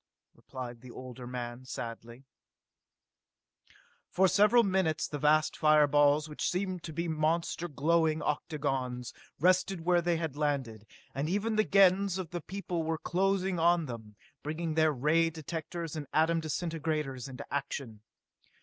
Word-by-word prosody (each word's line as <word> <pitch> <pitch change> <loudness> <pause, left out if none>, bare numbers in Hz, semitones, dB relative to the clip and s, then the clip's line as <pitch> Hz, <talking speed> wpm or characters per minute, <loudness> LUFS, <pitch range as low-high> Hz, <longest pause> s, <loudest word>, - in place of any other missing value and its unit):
replied 125 -3 -8
the 130 - -12
older 125 0 -9
man 120 0 -6
sadly. 120 0 -7 1.9
For 190 +1 +3
several 210 +5 +5
minutes 185 -6 +1
the 145 - -5
vast 155 +2 +3
fire 155 -1 +5
balls, 145 +1 +3
which 150 - -2
seemed 185 -1 -2
to 160 - -6
be 170 +2 -3
monster 165 +2 0
glowing 160 +1 +1
octagons, 135 -5 -2 0.3
rested 185 +2 +2
where 175 +1 +3
they 170 -1 +1
had 160 -4 -3
landed, 135 -8 -2 0.3
and 140 +3 -2
even 210 +4 0
then - - -2
the 215 - +2
Gens 195 -1 +4
of 185 -4 -5
the 175 -1 -4
people 185 -1 -4
were 160 0 -1
closing 190 +1 0
on 170 0 +3
them, 110 -5 -8 0.3
bringing 160 +2 -3
their 155 0 +3
ray 155 +5 +2
directors 165 +1 -6
and 150 -3 -5
atom 165 +2 +3
disintegrators 155 -5 -3
into 125 -2 -8
action. 135 -6 -4
155 Hz, 145 wpm, -30 LUFS, 135-175 Hz, 1.9 s, several